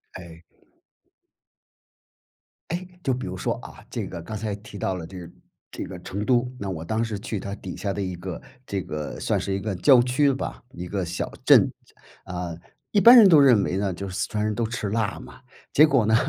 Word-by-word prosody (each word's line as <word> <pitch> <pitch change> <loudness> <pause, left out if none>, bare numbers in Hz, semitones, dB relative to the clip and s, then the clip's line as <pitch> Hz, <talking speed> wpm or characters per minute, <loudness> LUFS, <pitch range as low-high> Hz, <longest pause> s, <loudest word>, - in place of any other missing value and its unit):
哎。 85 -2 -11 2.3
诶， 175 +2 -3 0.2
就 135 - +1
比 125 -4 -4
如 90 - -5
说， - - -1
啊， - - -12
这 - - -4
个 85 - -7
刚 110 +6 -7
才 105 -1 -3
提 105 0 -11
到 95 -1 -1
了 85 -3 -6
这 95 +2 -9
个 85 - -9 0.4
这 - - -5
个 90 -2 -8
成 100 +3 -4
都。 125 0 +2
那 100 - -4
我 80 -4 -4
当 110 +6 0
时 110 -3 -3
去 110 -1 -4
它 100 +1 -5
底 95 -3 -8
下 100 - -3
的 100 - -3
一 95 -2 -3
个 90 0 -7 0.2
这 100 -4 -3
个 75 -2 -5
算 - - 0
是 100 - -3
一 95 - -1
个 100 0 -3
郊 125 +6 +6
区 135 +3 +2
吧， 135 - -5
一 90 -4 -7
个 95 -1 -2
小 85 +2 -4
镇。 - - +6 0.5
啊， 90 -2 -5 0.4
一 205 - +3
般 240 +4 +10
人 220 -4 +9
都 165 -5 +7
认 125 -8 +6
为 95 - -1
呢， 100 -1 -1
就 100 +3 -6
是 90 - -7
四 - - 0
川 105 0 -1
人 105 0 -1
都 115 - 0
吃 110 -2 -3
辣 110 -2 -1
嘛， - - -13 0.3
结 150 - +8
果 135 -7 +3
呢， 110 +1 +3
100 Hz, 235 characters per minute, -24 LUFS, 90-120 Hz, 2.3 s, 般